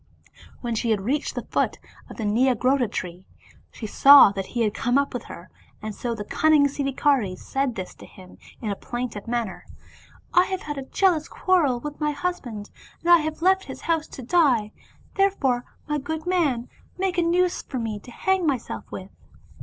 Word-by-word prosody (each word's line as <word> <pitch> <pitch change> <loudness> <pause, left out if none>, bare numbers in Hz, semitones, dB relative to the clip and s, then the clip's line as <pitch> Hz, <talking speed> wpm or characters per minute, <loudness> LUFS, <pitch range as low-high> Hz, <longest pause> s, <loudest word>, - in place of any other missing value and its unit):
When 240 -2 -2
she 225 +1 -1
had 215 -3 +1
reached 275 +9 -1
the - - -3
foot - - +1 0.3
of - - -11
a - - -2
Nyagrodha 250 +3 +2
tree, 180 +1 -6 0.4
she 225 - -8
saw 275 +1 +8
that 195 -1 -4
he 240 - -3
had 210 -2 0
come 245 +3 +1
up 280 0 0
with 245 - -5
her, 170 0 -11 0.3
and 215 0 -5
so 235 +2 -3
the 210 - -5
cunning 310 +2 +4
Siddhikari 275 -7 0
said 270 +1 -2
this 185 -3 -6
to - - -14
him 185 -1 -15 0.2
in 215 - -2
a - - -2
plaintive 240 -2 -5
manner, 230 -4 -3 0.4
" - - -27
I 355 +1 +6
have 375 -1 -4
had 295 -2 -4
a 265 - -9
jealous 345 -5 +2
quarrel 315 -10 +1
with 295 +1 -7
my 300 0 +1
husband, 275 -10 -4 0.3
and 345 - +2
I 345 - +9
have 315 +1 -4
left 380 +1 +3
his - - -9
house 325 -2 0
to 260 - -10
die, 250 -8 +3 0.5
therefore 275 -12 +1 0.2
my 300 -1 -1
good 315 +3 -5
man, 300 -10 +1 0.3
make 370 -1 0
a - - +4
noose 350 +1 +1
for 265 - -6
me 225 -3 -3
to 225 - -14
hang 375 +6 0
myself 265 -5 -3
with." 190 +1 -8
270 Hz, 195 wpm, -24 LUFS, 225-315 Hz, 0.5 s, I